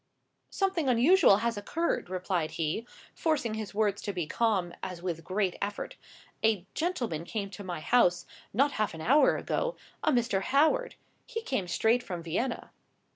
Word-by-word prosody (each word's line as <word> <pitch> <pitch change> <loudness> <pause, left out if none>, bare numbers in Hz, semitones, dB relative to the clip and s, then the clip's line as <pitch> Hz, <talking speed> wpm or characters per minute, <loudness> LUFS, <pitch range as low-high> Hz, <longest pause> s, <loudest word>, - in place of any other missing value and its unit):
"Something 380 -8 0
unusual 250 - +6
has 235 -2 0
occurred," 320 - -1
replied 180 -3 -1
he, 165 +9 -1 0.3
forcing 295 -9 0
his 215 -2 -5
words 205 -2 +1
to 205 - -3
be 175 -3 -2
calm, 190 -2 0
as 180 -2 -5
with 175 -2 -3
a - - -12
great 185 +2 -1
effort. 205 0 -4 0.5
"A 215 -5 +2
gentleman 250 - -2
came 200 +2 -4
to 200 +1 -8
my 175 -4 -5
house, 180 -5 +3 0.3
not 275 +7 +3
half 210 - 0
an 160 - -8
hour 280 - +4
ago—a - - -2
Mr. 235 -6 +1
Howard. 315 - +2 0.3
He 455 -2 -4
came 235 - -1
straight 225 +7 +2
from 180 -8 -6
Vienna." 210 +10 -2
215 Hz, 160 wpm, -29 LUFS, 180-265 Hz, 0.5 s, unusual